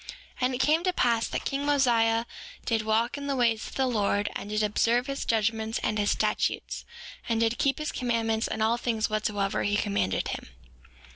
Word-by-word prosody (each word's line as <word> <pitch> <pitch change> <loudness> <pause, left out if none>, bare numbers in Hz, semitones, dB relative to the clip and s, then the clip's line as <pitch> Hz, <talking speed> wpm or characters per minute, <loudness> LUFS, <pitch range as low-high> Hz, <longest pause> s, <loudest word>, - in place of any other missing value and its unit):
6:6 - - -19 0.3
And 255 0 +1
it - - -2
came 305 +5 +3
to 365 -1 +1
pass 235 -7 +2
that - - -4
king 275 0 -1
Mosiah 235 -5 +3 0.4
did 225 -2 +1
walk 225 +5 0
in 280 - -5
the 280 - 0
ways 230 -3 +1
of - - -10
the 265 - +2
Lord, 205 -4 0
and 205 - -5
did 215 0 0
observe 230 +4 +2
his 275 0 -4
judgments 220 0 0
and 215 0 0
his 205 - +1
statutes, - - -1 0.4
and 225 -1 +1
did 230 +1 +1
keep 275 -1 +2
his 305 0 -3
commandments 230 -2 0
in 220 - -2
all 225 +2 +2
things 230 -2 -1
whatsoever 210 -2 0
he 205 0 +1
commanded 100 - 0
him. - - -5
225 Hz, 200 wpm, -27 LUFS, 215-250 Hz, 0.4 s, came